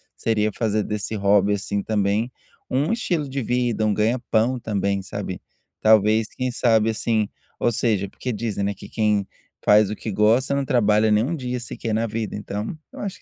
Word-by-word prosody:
seria 110 -1 +1
fazer 110 -2 0
desse 105 0 -3
hobby 100 0 +3
assim 100 0 -3
também, 105 +3 0 0.4
um 145 - +1
estilo 175 -10 -1
de 135 0 -3
vida, 120 -2 0
um 105 - +2
ganha-pão 115 +2 +1
também, 100 -3 -1
sabe. 95 -1 -6 0.4
Talvez, 110 0 +4
quem 130 0 -3
sabe 115 -3 +3
assim, 110 -1 0 0.3
ou - - +2
seja, 105 -4 0
porque 125 - -5
dizem, 105 -2 -2
né, 100 +1 0
que - - -12
quem 105 -3 +1 0.4
faz 105 -1 +6
o 105 - -3
que 110 - -5
gosta 115 +7 +3
não 140 - 0
trabalha 110 -5 +3
nem 105 +1 +4
um 165 +5 -2
dia 125 -3 -3
sequer 115 -2 -4
na 115 +1 +1
vida. 110 -1 -3
Então, 105 +4 -4 0.2
eu - - -10
acho 200 -2 -4
que - - -19
110 Hz, 185 wpm, -23 LUFS, 105-120 Hz, 0.4 s, faz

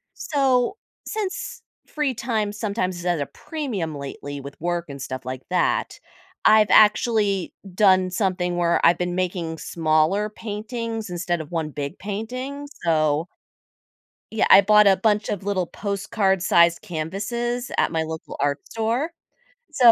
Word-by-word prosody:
So, 270 - +1 0.3
since 480 +4 -4 0.2
free 295 -4 -2
time 220 -3 -1
sometimes 200 -3 -2
is 175 - -8
at 175 -4 +1
a 140 - -2
premium 220 - -4
lately 140 0 -7
with 140 +1 -10
work 175 +1 -1
and 140 0 -7
stuff 130 0 -5
like 130 0 -5
that, 180 -1 0 0.5
I've 215 -1 +6
actually 210 -3 +4 0.2
done 185 -2 +4
something 180 -2 -1
where 170 -1 +2
I've 170 +1 +5
been 180 0 -2
making 175 -3 -2
smaller 160 +6 +1
paintings 225 +1 -5
instead 175 -1 -2
of 155 - -11
1 165 -3 -2
big 145 +3 -5
painting, 255 +8 -5 0.2
so 155 -1 +2 1.0
Yeah, 220 - +1
I 195 - +9
bought 210 +1 +6
a 195 -1 +5
bunch 210 +1 +1
of 200 -2 -3
little 190 -3 -1
postcard 200 -2 -1
sized 170 -1 +4
canvases 225 +9 -3
at - - +2
my 160 -1 0
local 160 0 -7
art 145 0 +1
store, 230 +8 -1 0.6
so 250 -6 +7
195 Hz, 145 wpm, -23 LUFS, 170-225 Hz, 1.0 s, I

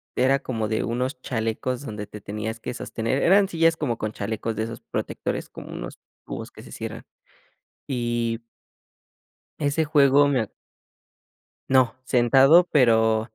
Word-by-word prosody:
era 135 +2 +3
como 110 -6 -3
de 110 0 -1
unos 125 +3 -2
chalecos 115 +2 -2
donde 105 -3 -5
te 105 0 -10
tenías 110 +3 -5
que 125 - -5
sostener. 115 +3 -2
Eran 195 +2 +5
sillas 165 -1 +2
como 120 -7 -1
con 110 -2 -3
chalecos 110 +2 -3
de 110 - -1
esos 115 0 -6
protectores, - - -4
como - - -10
unos - - -7 0.3
cubos - - -7
que - - -13
se - - -13
cierran. - - -6 0.9
Y 120 -2 -1 1.2
ese 145 +2 +1
juego 145 -1 +5
me 135 -4 +2
a 110 - -3 1.2
No, 130 -2 +4
sentado, 135 +8 +5
pero, 110 -5 +4
120 Hz, 145 wpm, -24 LUFS, 110-140 Hz, 1.2 s, Eran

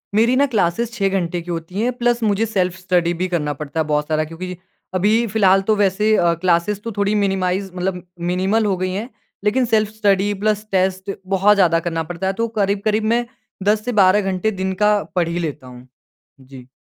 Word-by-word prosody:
मेरी 230 +4 +4
ना 280 +2 +4
क्लासेस 210 +3 +1
6 200 -4 0
घंटे 175 -2 -1
की 175 +1 -7
होती 170 +5 -4
हैं, 245 - +1
प्लस 240 -1 +1
मुझे 210 +1 +2
सेल्फ 185 -5 -1
स्टडी 180 -2 +1
भी 185 - +1
करना 150 -3 0
पड़ता 150 +2 -4
है 160 - +1
बहुत 150 0 0
सारा। 155 0 +1
क्योंकि 175 +3 -7 0.4
अभी 210 +5 +2
फ़िलहाल 195 -2 +3
तो 215 - +5
वैसे 210 +2 +2
अ, 170 -4 +3
क्लासेस 180 +4 0
तो 230 - -4
थोड़ी 200 +1 +1
मिनिमाइज़ 190 -1 0
मतलब 180 -1 -3 0.3
मिनिमल 195 +5 +1
हो 200 -2 +1
गई 185 0 -2
हैं। 215 +6 -4 0.3
लेकिन 245 +5 +2
सेल्फ 215 -2 +1
स्टडी 205 -2 +1
प्लस 215 0 0
टेस्ट 190 +1 0 0.2
बहुत 195 +2 +4
ज़्यादा 170 -4 +3
करना 165 -1 -2
पड़ता 185 +2 -3
है, 190 - 0
तो 230 +3 -1
करीब-करीब 205 +2 +1
मैं 240 +1 +1 0.4
10 210 +2 +1
से 245 - -1
12 190 +2 +5
घंटे 185 +4 0
दिन 190 -1 -2
का 210 - +5 0.2
पढ़ 175 -2 +2
ही 170 +1 -2
लेता 150 -5 -5
हूँ। 125 0 -13 0.5
जी। 130 -1 -13
190 Hz, 205 wpm, -20 LUFS, 175-210 Hz, 0.5 s, तो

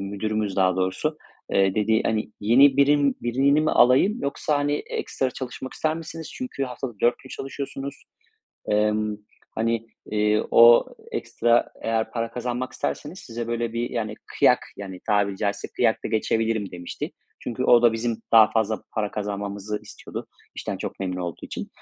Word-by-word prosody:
müdürümüz 100 +1 -2
daha 95 -1 +3
doğrusu, 95 +12 -1 0.4
dediği, 105 +3 +3
hani, 110 -1 -1
yeni 130 +6 +6
birim 140 0 +4
birini 135 +5 +3
mi 155 - +2
alayım 130 - +5
yoksa, 145 +1 0
hani, 145 0 +1 0.2
ekstra 130 - -2
çalışmak 130 0 -6
ister 155 0 -1
misiniz? 165 0 -7
Çünkü 250 - -3
haftalık 125 -3 -6
4 120 - +3
gün 130 - -14
çalışıyorsunuz. 135 +1 -6 0.7
Emm, 105 0 +1 0.3
hani, 115 0 -1 0.2
eee, 105 0 +2
o 120 0 +8 0.3
ekstra 120 0 +1
eğer 110 0 0
para 115 -1 -2
kazanmak 125 +1 -3
isterseniz 155 +6 -4
size 115 0 -6
böyle 120 -1 -2
bir, 120 +1 -2
yani, 110 -3 -3
kıyak, - - +4 0.2
yani 95 -2 -7
tabiri 100 -2 +2
caizse 100 0 -2
kıyak - - +2
da - - -1
geçebilirim 110 -2 0
demişti. 90 0 -6 0.3
Çünkü 125 +1 -3
o 120 -2 +6
da 120 -1 +6
bizim 115 0 -1 0.2
daha 110 -2 +8
fazla 110 -1 0
para 105 -2 -1
kazanmamızı 100 0 -4
istiyordu - - -8 0.3
işten - - -4
çok - - -6
memnun 90 -1 -2
olduğu 85 -2 -5
için. - - -6
115 Hz, 155 wpm, -24 LUFS, 105-130 Hz, 0.7 s, o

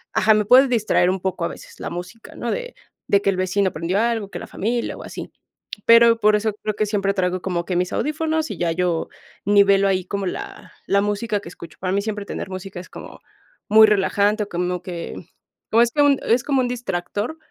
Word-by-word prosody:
Ajá, 220 0 +4
me 210 0 +1
puede 255 +5 +7
distraer 220 -7 +2
un 190 +1 -1
poco 185 -1 -3
a - - +1
veces - - -11
la - - -4
música, 180 +6 -9
¿no? - - -3
De - - -5 0.3
de 200 - +3
que 200 - +1
el 195 - +1
vecino 185 +1 0
prendió 170 +5 -1
algo, 225 -3 0
que - - -7
la - - -8
familia 235 +4 -2
o - - -10
así, - - -8 0.6
pero 230 0 +6
por 210 0 +5
eso 215 0 -1
creo 215 - -1
que 215 - 0
siempre 200 -1 0
traigo 185 -1 -1
como 175 -2 -2
que 180 - -2
mis 180 +1 0
audífonos 315 +1 -1
y - - -5
ya 170 -1 0
yo 170 -1 -1 0.3
nivelo 200 -1 +4
ahí 185 -2 0
como 200 -1 -3
la - - -7
la 200 0 +2
música 205 +1 -1
que 170 - -10
escucho. 170 -2 -12
Para 185 -1 -1
mí 200 +1 +1
siempre 210 -1 -4
tener 195 - -6
música 185 0 -7
es 180 - -11
como - - -11 0.5
muy 220 +1 +7
relajante 205 +1 +2
o 205 - -9
como 180 0 -2
que 175 -2 -6 0.6
como 230 - +5
es 235 0 +3
que 295 - +1
un 285 -1 +4
es 240 +2 +2
como 275 -3 +2
un 245 - 0
distractor, 230 - -3
200 Hz, 225 wpm, -21 LUFS, 185-230 Hz, 0.6 s, puede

